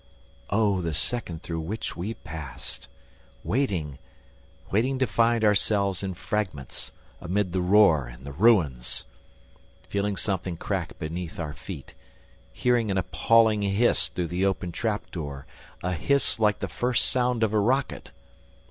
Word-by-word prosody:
Oh, 100 -3 +2
the 80 -3 -2
second 90 -8 -2
through 80 -2 -3
which 100 +8 -4
we 100 +7 -4
passed! 75 -4 -7 0.6
Waiting! 90 - -1 0.7
Waiting 125 +7 +2
to 130 - +2
find 115 -1 +2
ourselves 100 -2 +2
in 95 -2 -3
fragments, 90 - -3 0.3
amid 95 +1 0
the 95 - +1
roar 90 - +5
and - - -12
the 70 - -6
ruins! 80 - +2 0.8
Feeling 100 0 0
something 95 -3 -2
crack - - -3
beneath 85 +2 -5
our 75 -3 -3
feet, 80 -2 -9 0.6
hearing 120 - +1
an 95 - +1
appalling 105 +5 +3
hiss 100 +4 +3
through 85 -2 -3
the 90 +3 -1
open 95 -2 0
trap 105 +3 -2
door, 70 -5 -5 0.4
a 90 +1 0
hiss 140 - +1
like 105 -1 +2
the - - -1
first 125 -1 +1
sound 125 -2 +1
of 110 -1 +1
a 110 - +4
rocket! 130 +6 0
100 Hz, 140 wpm, -26 LUFS, 85-110 Hz, 0.8 s, roar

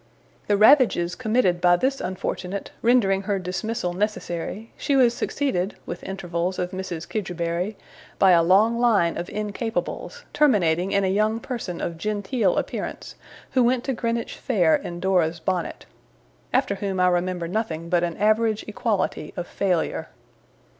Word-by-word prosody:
The 205 - +3
ravages 215 - +5
committed 215 -5 +1
by 175 0 +5
this 265 +9 0
unfortunate, 185 +1 -4
rendering 220 -5 +3
her 200 0 -1
dismissal 185 +1 -3
necessary, 205 +1 -3
she 280 - 0
was 250 -3 +5
succeeded 240 -8 -1
(with 175 - -6
intervals 180 -1 -3
of 180 0 -2
Mrs. 185 -3 -5
Kidgerbury) 180 0 -2 0.4
by 190 -1 +5
a 170 -1 +6
long 205 +7 +4
line 210 -9 +3
of 175 - -4
Incapables; 225 - -4
terminating 190 - +3
in 200 0 +2
a - - +2
young 215 +4 +1
person 230 -8 -5
of 170 -1 -4
genteel 210 +1 0
appearance, - - -4 0.4
who 255 -2 +3
went 245 +1 +2
to 270 - -1
Greenwich 230 0 -2
Fair 180 -10 +3
in 175 0 -5
Dora's 175 -3 +1
bonnet. 180 +1 -3 0.7
After 255 -4 +2
whom 195 -1 -3
I 180 - +4
remember 180 -1 0
nothing 170 -4 -3
but 175 0 +2
an 170 -1 -2
average 215 +1 +2
equality 210 -1 -2
of 175 - -3
failure. 180 -2 -1
195 Hz, 145 wpm, -24 LUFS, 175-225 Hz, 0.7 s, a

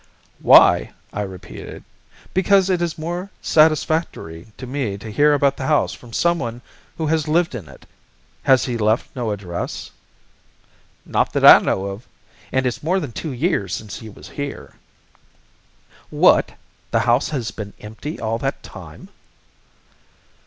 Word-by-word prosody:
"Why!" - - +6 0.2
I 105 - -2
repeated. 95 -3 -8 0.5
"Because 190 0 +3
it 180 -2 +1
is 170 -1 -2
more 175 +4 -4
satisfactory 155 - +1
to 130 - -7
me 125 -6 -3
to 110 +2 -9
hear 145 +6 +4
about 140 -1 +2
the 130 - -4
house 150 -1 +2
from 120 - -13
someone 125 -6 -1 0.3
who 160 - -2
has 155 0 0
lived 165 +1 +1
in 100 - -7
it. 70 - -15 0.6
Has 130 -1 +4
he 120 -3 -3
left 110 +2 0
no 120 -3 -2
address?" 95 -4 -5 1.1
"Not - - 0
that - - +2
I - - +11
know 95 - -1
of, 100 +4 -7 0.4
and 130 0 +1
it's 125 - -2
more 180 +5 +1
than 145 -9 -5
two 155 +6 -5
years 125 - -1
since 105 -2 -7
he 110 - -10
was 105 - -13
here." 145 0 -6 1.4
"What! - - +4 0.4
The - - +1
house 120 +3 +2
has 125 -7 -3
been 100 -2 -8
empty 110 +9 -7
all 115 0 -2
that 135 +2 -3
time?" - - -12
130 Hz, 150 wpm, -21 LUFS, 110-155 Hz, 1.4 s, I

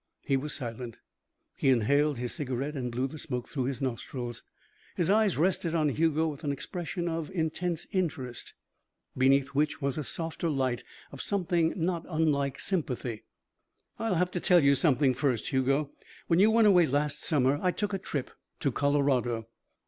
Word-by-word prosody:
He 135 - +1
was 145 +3 -2
silent. 120 -2 -6 0.6
He - - +1
inhaled 140 +4 +3
his 120 0 -3
cigarette 135 +1 -3
and 125 -3 -3
blew 125 +3 -1
the 155 +3 -9
smoke 125 -5 -4
through 130 -5 -2
his 135 +1 -3
nostrils. 120 -1 -4 0.5
His 175 +1 +1
eyes 215 -2 +3
rested 170 0 +1
on 155 -2 +2
Hugo 160 +2 +1
with 150 0 -6
an 145 - 0
expression 175 +4 -4
of 165 -2 -2
intense 170 -1 -2
interest, 145 - -3 0.6
beneath 135 +1 +3
which 150 +2 0
was 140 0 -1
a - - -2
softer 165 +3 -3
light 130 -4 0 0.3
of 140 - -7
something 175 -4 +1
not 170 0 -1
unlike 150 -4 +1
sympathy. 125 - -2 0.7
"I'll 225 -4 0
have 180 +2 +1
to 180 - -2
tell 175 -3 +4
you 140 0 +6
something, 140 -2 +3
first, 125 -3 0
Hugo. 135 +2 +1 0.3
When 170 0 +2
you 210 +3 +6
went 225 0 +5
away 180 -5 +6
last 145 +1 0
summer, 140 -2 +2
I 180 - +2
took 205 +3 -2
a 195 - -1
trip 140 -7 -4 0.3
to 140 - +1
Colorado." 130 -5 +1
145 Hz, 170 wpm, -29 LUFS, 130-170 Hz, 0.7 s, you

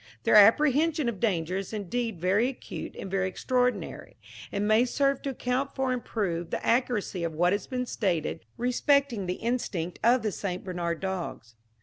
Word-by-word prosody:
Their - - +2
apprehension 290 +7 +5
of 225 -5 -2
danger 180 -5 0
is 195 +2 -5
indeed 215 0 -3
very 195 +7 +2
acute 265 - -7
and 195 - -7
very 190 -1 +1
extraordinary, 250 +6 -1 0.3
and 205 +1 -1
may 215 +2 +5
serve 275 +2 +1
to 280 - -3
account 260 +1 -2
for 265 -1 0
and 250 - -3
prove 175 -6 -2
the - - -3
accuracy 230 -7 0
of 165 -1 -2
what 175 +3 +3
has 205 - -2
been 250 -1 -2
stated 180 -10 -1
respecting 250 -3 +1
the 180 - -1
instinct 205 -8 -3
of 240 +1 +4
the 215 - 0
St. 185 -2 -4
Bernard 175 -3 -3
dogs. 185 -11 -4
215 Hz, 175 wpm, -28 LUFS, 185-250 Hz, 0.3 s, apprehension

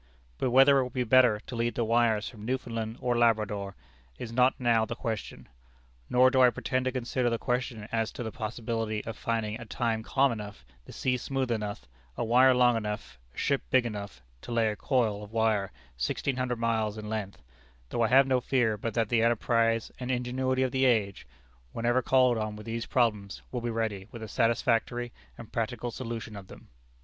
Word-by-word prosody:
But 130 - +1
whether 135 +2 +6
it - - +2
would 125 0 -7
be 125 - 0
better 120 -2 +5
to 125 - -7
lead 115 0 -1
the 120 - 0
wires 115 -2 +2
from 110 -4 -10
Newfoundland 115 -2 -3
or 125 -1 0
Labrador 105 -4 +1 0.4
is 115 -2 -7
not 125 +2 +3
now 120 -3 +3
the 120 +2 -4
question; 110 -4 -5 0.6
nor 130 +1 +5
do 130 -1 +4
I 125 - +8
pretend 130 +1 -2
to 130 - +1
consider 125 0 -1
the 115 - 0
question 125 -3 -2
as 115 -1 0
to 125 - -5
the 110 - -4
possibility 110 -1 -3
of 115 - -5
finding 110 -1 -2
a - - -7
time 115 0 -1
calm 135 +4 +2
enough, 105 - -7 0.2
the - - -11
sea 125 -1 0
smooth 130 0 -2
enough, 105 -2 -3 0.3
a - - -1
wire 125 +3 +5
long 125 -1 +4
enough, 105 - -5 0.2
a - - -21
ship - - +1
big 125 - +3
enough, 100 - -6 0.2
to - - -9
lay 115 -2 +2
a 105 - -3
coil 110 -5 0
of 105 0 -10
wire 110 -3 +1 0.3
sixteen 125 - -1
hundred 125 -1 -1
miles 110 -2 0
in 105 0 -7
length: 105 - -5 0.5
though 120 - -2
I 115 - +4
have 135 +3 +6
no 130 -1 +1
fear 120 -5 +1
but 115 +2 -4
that 115 -3 +1
the 115 -2 +3
enterprise 115 0 +1
and 125 0 -5
ingenuity 130 +1 0
of 130 - 0
the 130 +1 +2
age, 105 -6 +1 0.5
whenever 120 +2 +1
called 125 -1 +3
on 110 -1 -3
with 105 - -10
these 115 0 -4
problems, 105 -6 0
will 125 - -3
be 120 - -2
ready 110 -4 -2
with 115 -2 -9
a - - -6
satisfactory 120 +1 0 0.3
and 115 - -11
practical 120 +1 -2
solution 115 -3 -6
of 100 -2 -9
them. - - -14
115 Hz, 200 wpm, -28 LUFS, 110-125 Hz, 0.6 s, I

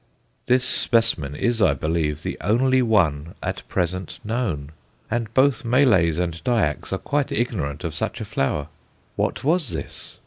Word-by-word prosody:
This 125 +1 +4
specimen 115 - +1
is, 120 +6 0
I 95 - +4
believe, 80 -2 -1
the - - -3
only 130 +4 +3
one 85 - +1
at - - -3
present 90 0 -2
known, 105 - -2 0.4
and 115 -1 -1
both 135 0 +3
Malays 115 - +4
and 85 -2 -2
Dyaks 100 - 0
are 95 - 0
quite 145 +6 -1
ignorant 85 - -2
of 85 -3 -3
such - - -3
a - - -4
flower! 70 +2 -1 0.5
What - - -1
was 160 -1 +2
this? - - -7
100 Hz, 150 wpm, -23 LUFS, 80-120 Hz, 0.5 s, This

